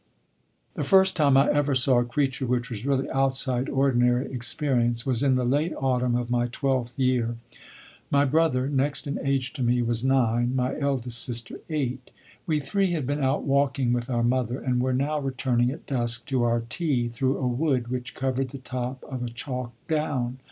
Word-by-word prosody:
The - - -3
first 190 -1 +4
time 140 -5 +4
I 135 - +5
ever 145 -1 +1
saw 130 -1 +4
a - - +2
creature 135 +1 -1
which 125 0 -1
was 115 +3 -5
really 135 -1 +1
outside 135 -1 +1
ordinary 125 -1 +1
experience 120 -2 +1
was 130 -3 +1
in 135 -2 +3
the 125 -1 0
late 145 +7 +1
autumn 125 -2 +1
of 120 0 -2
my 120 0 +1
twelfth 125 -1 -2
year. 125 -3 +1 0.7
My 140 0 +3
brother, 140 -3 +2
next 140 +2 0
in 140 0 -3
age 135 -1 0
to 145 - -6
me, 120 0 +2
was 115 0 +1
nine, 125 -2 +2
my 130 +1 0
eldest 125 -5 0
sister 120 -2 -1
eight. 130 -5 -3 0.4
We 155 -2 +1
three 190 +5 0
had 155 -6 -2
been 145 +2 -2
out 135 +2 +1
walking 135 -3 +1
with 120 +1 -2
our 120 -2 0
mother, 125 0 0
and 125 -1 0
were 130 +1 0
now 140 +4 0
returning 130 -3 0
at 145 +5 -7
dusk 120 -3 0
to 130 -2 +1
our 120 0 +1
tea 125 -2 -1
through 130 +3 -1
a 130 - -1
wood 125 -1 0
which 125 -1 -5
covered 130 0 -1
the 135 - -8
top 130 0 -5
of 130 -2 -6
a 120 - -3
chalk 125 0 -5 0.2
down. 135 -5 -1
130 Hz, 190 wpm, -25 LUFS, 120-140 Hz, 0.7 s, I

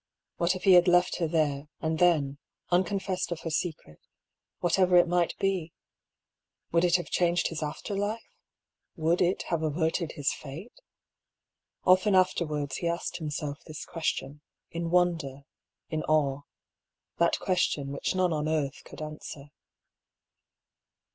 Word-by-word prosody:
What 175 +2 +2
if 185 - -7
he 195 - +7
had 175 0 +7
left 180 0 +4
her 170 - 0
there 150 -3 0
and 160 0 -1
then, 145 -6 +3 0.3
unconfessed 185 0 0
of 170 - -3
her 165 - -4
secret, 155 - -3 0.6
whaterer 180 +1 +4
it 175 0 +6
might 175 0 +1
be? 185 -4 -1 1.0
Would 170 +1 +3
it 175 -1 +4
have 175 - -1
changed 175 -1 +2
his 165 -2 -5
after 155 +7 -4
life? 205 +3 -3 0.6
would 165 +1 +1
it 180 +1 +2
have 170 -2 0
averted 160 +2 0
his 145 -1 0
fate? 155 - -9 1.1
Often 185 +2 +5
afterwards 155 -6 +1
he 170 - -2
asked 170 0 -2
himself 150 -2 -4
this 155 0 -7
question, 150 -3 -3 0.3
in 170 0 -3
wonder, 165 -6 +1 0.5
in 155 -1 -1
awe: 145 -3 +2 0.8
that 170 0 +3
question 155 -6 0
which 140 +6 -2
none 180 -2 +2
on 155 0 -1
earth 150 -3 -1
could - - -9
answer. 150 -2 -8
170 Hz, 140 wpm, -28 LUFS, 150-180 Hz, 1.1 s, he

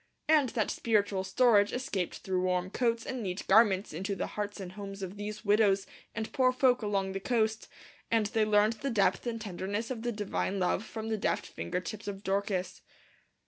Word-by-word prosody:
And 300 -4 +4
that 215 - +1
spiritual 205 -4 +1
storage 210 -1 +4
escaped 205 -8 -2
through 185 -1 0
warm 180 0 0
coats 230 -1 0
and 255 -2 -4
neat 185 -2 -4
garments 200 -2 +4
into 195 +1 -3
the - - -2
hearts 205 0 -4
and 185 -2 -6
homes 195 0 -7
of 190 +1 -5
these 210 +2 -6
widows 200 -2 +3 0.3
and 220 0 -4
poor 255 -3 +4
folk 255 -1 +3
along 200 -2 0
the 195 - -3
coast, 220 0 0 0.4
and 225 -2 +2
they 220 +1 +1
learned 215 +1 +4
the 275 - -1
depth 220 +1 +1
and 230 -1 -2
tenderness 205 +3 -4
of 235 -3 -4
the 240 +1 -1
divine 205 -2 -2
love 185 +2 +1
from 220 0 -6
the 220 - 0
deft - - 0
finger 180 - -4
tips 205 +4 -7
of 200 0 -5
Dorcas. 195 -1 -1
210 Hz, 190 wpm, -30 LUFS, 195-225 Hz, 0.4 s, And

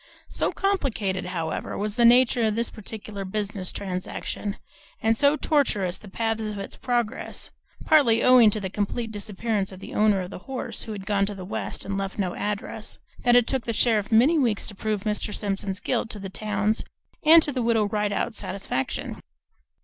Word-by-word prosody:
So - - 0
complicated, 225 - -1
however, 165 -3 -3
was 210 0 -2
the 235 +2 +3
nature 245 +1 +6
of 215 -2 +2
this 235 +1 -1
particular 215 -1 -7
business 195 -1 -3
transaction, 195 +1 -4 0.4
and 225 +1 +2
so 285 +5 +4
tortuous 210 - +1
the 205 - -12
paths 225 +1 -1
of 210 - -5
its 195 - -6
progress 240 -3 -2 0.3
(partly 275 -8 +5
owing 250 -3 +7
to 215 - -1
the 190 -2 -4
complete 220 +3 -2
disappearance 205 -1 -2
of 190 - -10
the - - -9
owner 210 -2 +3
of 180 +1 -6
the - - -7
horse, 265 -1 -4
who 220 - -5
had 195 -2 -7
gone 200 -1 +1
to 205 - -5
the 185 -1 -7
West 190 - -4
and 195 0 -2
left 195 0 -4
no 185 -3 -1
address), 210 +1 -4 0.2
that 245 0 +4
it 245 -1 +6
took 265 -1 -1
the 230 - -1
sheriff 220 -2 +2
many 265 +9 +5
weeks 230 -7 +1
to - - -5
prove 210 0 -2
Mr. 210 0 -2
Simpson's 195 -2 -2
guilt - - -1
to 215 - -4
the 195 -1 -6
town's 210 +1 0 0.4
and 325 +1 +8
to 290 - 0
the 255 -2 -2
Widow 230 -2 +2
Rideout's 210 +2 -1
satisfaction. 185 -9 -3
210 Hz, 190 wpm, -25 LUFS, 195-235 Hz, 0.4 s, and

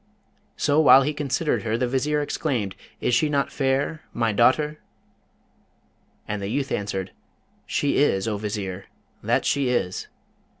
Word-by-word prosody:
So, 145 +1 +2
while 135 -3 +8
he 150 +3 -1
considered 145 +1 -1
her, 115 0 -1
the 125 +1 0
Vizier 145 +4 0
exclaimed, 120 -10 -2 0.3
'Is 125 - +1
she 135 +6 +3
not 140 -2 0
fair 140 +3 0
my 115 -1 +1
daughter?' 150 +7 +2 1.5
And 105 -1 -3
the 100 - -3
youth 135 +4 -2
answered, 95 -2 -3 0.6
'She 145 - 0
is, 105 -8 +2
O 105 -2 -1
Vizier, 100 -2 -4 0.4
that - - +1
she 140 -3 +1
is!' 95 -7 -1
130 Hz, 140 wpm, -24 LUFS, 105-145 Hz, 1.5 s, while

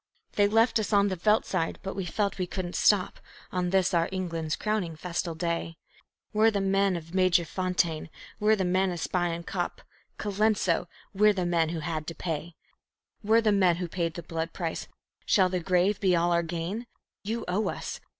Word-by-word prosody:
"They 205 -1 +4
left 225 +2 +3
us 215 - -2
on 200 0 +4
the 190 - -1
veldt 210 +5 +2
side, 165 -4 -1
but 195 - -4
we 190 -2 -3
felt 200 +3 -1
we 180 - -1
couldn't 180 -1 -4
stop 200 -3 +3 0.3
On 180 -1 -1
this, 190 -1 +2
our 170 -1 +2
England's 165 -4 -2
crowning 210 -6 -2
festal 170 0 -3
day; 165 0 -2 0.6
We're 215 +1 +5
the 205 -2 -1
men 195 0 +2
of 165 0 -7
Magersfontein, 180 -2 +1 0.3
we're 215 +1 +4
the 190 -3 -1
men 185 +2 +2
of 175 - -4
Spion 170 -1 -1
Kop, - - -3 0.4
Colenso 205 -4 +1 0.3
we're 210 +2 +5
the 185 -3 -1
men 170 -2 +2
who 165 -1 -3
had 155 -1 -3
to 165 - -5
pay. 165 0 -4 0.7
We're 220 +2 +4
the 220 -2 +3
men 185 -4 +4
who 175 +1 -3
paid 170 -1 -2
the 170 - -6
blood 165 0 -4
price. 165 -3 -4 0.4
Shall 185 -2 +4
the 180 0 -1
grave 180 +3 +2
be 185 -3 +3
all 170 +1 +2
our 170 0 +3
gain? 170 +7 -4 0.4
You 225 +3 -3
owe 185 +5 0
us. - - -5
180 Hz, 190 wpm, -28 LUFS, 170-200 Hz, 0.7 s, We're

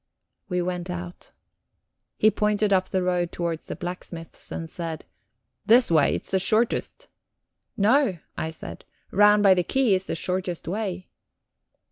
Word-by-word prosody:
We 180 -1 0
went 180 0 -4
out. 175 0 -7 0.9
He 215 - +4
pointed 210 0 +1
up 185 -1 +2
the 185 -1 0
road 180 -1 0
towards 170 -2 -4
the - - -5
blacksmith's 175 -2 -7
and 165 - -5
said: 165 -1 -6 0.6
"This 235 -2 +5
way 155 -3 +4
it's - - -7
the 190 - +2
shortest." 220 +5 +1 0.7
"No," 225 -1 +3 0.2
I 160 - -3
said. 160 - -9 0.3
"Round 210 +1 +5
by 195 -2 +7
the 180 -1 +1
quay 260 +1 +2
is 185 0 0
the - - -2
shortest 180 -1 -2
way." 190 -1 -3
185 Hz, 145 wpm, -25 LUFS, 175-210 Hz, 0.9 s, by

